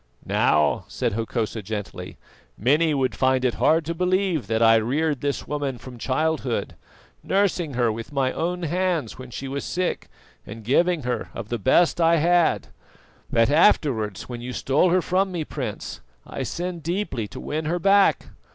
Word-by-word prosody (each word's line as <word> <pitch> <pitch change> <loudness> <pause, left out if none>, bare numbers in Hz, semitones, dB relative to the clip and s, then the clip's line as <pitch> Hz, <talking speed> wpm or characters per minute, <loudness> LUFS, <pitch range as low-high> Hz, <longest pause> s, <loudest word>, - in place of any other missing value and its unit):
"Now," - - +2
said - - -2
Hokosa 115 0 -2
gently; 105 0 -6 0.4
"many 150 +8 +3
would 135 -3 0
find 130 -1 +1
it 125 - +2
hard 160 0 +3
to 170 - -2
believe 180 -3 0
that 115 0 +1
I 115 0 +7
reared 140 +6 0
this 140 -1 -2
woman 145 -3 -3
from 125 -1 -11
childhood, 135 -1 -1 0.5
nursing 180 -7 0
her 120 -2 +2
with 115 +4 -7
my 135 -2 +1
own 175 +1 -2
hands 170 -7 -1
when 130 -1 -9
she 135 +3 -6
was 140 +1 -4
sick 180 0 -2 0.4
and 110 +1 -10
giving 170 +7 +2
her 120 -2 -3
of 115 -2 -6
the 120 - -2
best 170 - +3
I 165 0 +5
had; 170 +1 +2 0.6
that 115 +3 +3
afterwards, 135 - +2
when 120 -1 -6
you 125 +1 -6
stole 140 +9 +2
her 180 0 +2
from 190 +1 +1
me, 170 -3 -2
Prince, 125 -10 -6 0.2
I - - -6
sinned 175 -1 -4
deeply 165 - -2
to - - -9
win 155 +1 -3
her 170 +3 0
back. 195 +2 +3
145 Hz, 170 wpm, -24 LUFS, 120-170 Hz, 0.6 s, I